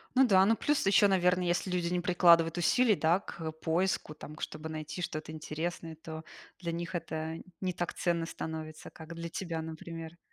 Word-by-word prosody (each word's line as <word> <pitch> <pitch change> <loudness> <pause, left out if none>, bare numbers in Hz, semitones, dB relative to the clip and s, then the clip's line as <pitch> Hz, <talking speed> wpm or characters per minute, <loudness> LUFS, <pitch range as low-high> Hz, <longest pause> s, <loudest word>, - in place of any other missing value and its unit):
Ну 265 +1 +7
да, 190 -3 +6
ну 225 +3 +4
плюс 295 +2 +1
ещё, 200 +1 +6
наверно, 180 -1 +3
если 175 +2 0
люди 180 -1 0
не 180 - +2
прикладывают 170 -2 +5
усилий, 225 +6 +4
да, 170 +2 +3
к 165 -5 -6
поиску, 160 +1 0
там 150 0 -9
к - - -13
чтобы 155 +1 -5
найти 155 +2 -5
что-то 155 -1 -4
интересное, 160 +1 -4
то 160 0 -8 0.4
для 170 -2 -3
них 170 +1 -4
это 160 -1 -3 0.2
не 185 -1 -1
так 175 0 -3
ценно 170 -2 0
становится, 160 -1 -6
как 160 0 -10
для 170 0 -5
тебя, 165 -2 -3
например. 160 +1 -7
170 Hz, 185 wpm, -31 LUFS, 160-180 Hz, 0.4 s, Ну